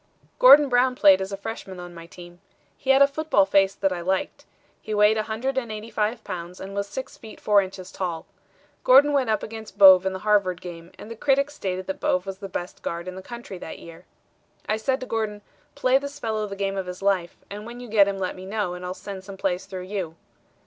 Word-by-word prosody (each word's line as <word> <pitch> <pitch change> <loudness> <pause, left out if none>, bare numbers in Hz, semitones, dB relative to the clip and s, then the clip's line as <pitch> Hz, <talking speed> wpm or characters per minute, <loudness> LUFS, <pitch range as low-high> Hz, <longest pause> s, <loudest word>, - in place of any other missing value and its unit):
"Gordon 295 -13 +9
Brown 250 0 +2
played 195 -5 +6
as 190 +1 -4
a 195 - -4
freshman 195 -3 -7
on 175 0 -9
my 165 0 -11
team. 175 0 -13 0.3
He 265 - -8
had 270 +1 +7
a - - +5
football 285 -8 +2
face 195 0 +3
that 195 -1 0
I 175 - -5
liked. 190 +2 -2 0.4
He 215 - -4
weighed 210 +1 +5
185 220 -1 -2
pounds 180 -1 -7
and 195 +1 -8
was 200 0 -2
6 265 +5 -7
feet 220 -2 -12
4 205 -1 +4
inches 185 -1 -8
tall. 170 -4 -4 0.6
Gordon 280 +3 +6
went 265 -4 +1
up 215 -1 0
against 220 0 -9
Bouvé 190 -1 +8
in 190 - -1
the - - -4
Harvard 200 -4 +2
game, 170 -1 -10
and 220 - -10
the - - -6
critics 280 +4 +1
stated 185 -8 -4
that 190 - -5
Bouvé 180 +1 +1
was 195 -1 -6
the 195 -2 -7
best 180 0 -6
guard 170 +1 -5
in 185 - -5
the 190 - -8
country 235 -3 -9
that - - -8
year. 165 -1 -13 0.6
I 215 - +1
said 260 +4 -1
to - - -4
Gordon, 215 -3 -3 0.3
'Play 260 +1 +3
this 280 +1 -7
fellow 220 -5 -2
the 200 - -7
game 195 0 -2
of 190 -1 -3
his 180 +1 -7
life, 190 -3 0
and 210 +2 -7
when 240 +1 -9
you 245 - -9
get 210 -2 +4
him, 200 -1 -2
let 185 -1 -3
me 185 +1 -10
know 205 -3 -2
and 180 0 -8
I'll 180 +1 -4
send 195 -1 -8
some 195 0 -10
plays 185 -1 -2
through 185 -2 -6
you.' 185 -4 -5
200 Hz, 230 wpm, -24 LUFS, 185-225 Hz, 0.6 s, Gordon